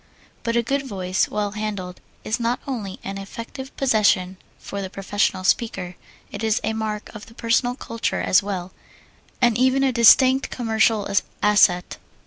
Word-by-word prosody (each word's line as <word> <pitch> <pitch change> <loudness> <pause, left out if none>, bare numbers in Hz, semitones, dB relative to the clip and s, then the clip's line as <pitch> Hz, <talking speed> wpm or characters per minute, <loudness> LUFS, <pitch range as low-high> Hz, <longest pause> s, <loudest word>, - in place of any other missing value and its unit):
But 230 0 -2
a 235 - +2
good 275 +3 -1
voice, 185 -4 -1
well 210 -1 -2
handled, 205 -4 -5 0.2
is 220 +3 -2
not 235 +1 0
only 215 -8 -5
an 195 0 -5
effective 230 +7 -9
possession 205 -7 +2 0.2
for 200 - -6
the 190 - -5
professional 195 -1 -1
speaker, 185 -3 0 0.4
it - - -6
is 220 +2 +2
a 220 - -1
mark 215 -1 -4
of 210 -1 -10
personal 240 +2 +1
culture 230 -3 -3
as - - +4
well, 190 -3 -5 0.7
and 240 -2 +4
even 260 +1 +3
a 270 - +3
distinct 260 +3 +6
commercial 220 -3 +1 0.4
asset. 190 -4 +3
215 Hz, 150 wpm, -22 LUFS, 195-235 Hz, 0.7 s, distinct